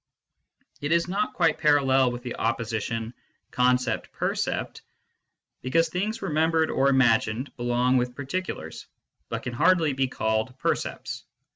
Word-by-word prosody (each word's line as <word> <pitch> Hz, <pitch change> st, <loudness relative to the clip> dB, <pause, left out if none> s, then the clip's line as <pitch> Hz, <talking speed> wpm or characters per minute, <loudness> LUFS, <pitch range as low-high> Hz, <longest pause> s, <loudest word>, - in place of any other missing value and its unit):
It 145 Hz, +2 st, -2 dB
is 170 Hz, 0 st, +3 dB
not 200 Hz, +4 st, -1 dB
quite 165 Hz, -3 st, +2 dB
parallel 135 Hz, -4 st, +4 dB
with 120 Hz, 0 st, -7 dB
the 125 Hz, -, -5 dB
opposition 115 Hz, 0 st, -2 dB, 0.2 s
" -, -, -46 dB
concept 125 Hz, 0 st, +1 dB
percept," -, -, -2 dB, 0.8 s
because 165 Hz, +6 st, +2 dB
things 200 Hz, +7 st, -2 dB
remembered 160 Hz, -1 st, +1 dB
or 135 Hz, +1 st, +3 dB
imagined 120 Hz, -1 st, +2 dB
belong 120 Hz, +1 st, +1 dB
with 125 Hz, 0 st, -1 dB
particulars, 140 Hz, -, -5 dB, 0.4 s
but -, -, -4 dB
can 120 Hz, -, -4 dB
hardly 165 Hz, +2 st, +3 dB
be 135 Hz, 0 st, +1 dB
called 110 Hz, +1 st, -1 dB
percepts. -, -, -3 dB
130 Hz, 130 wpm, -26 LUFS, 120-160 Hz, 0.8 s, parallel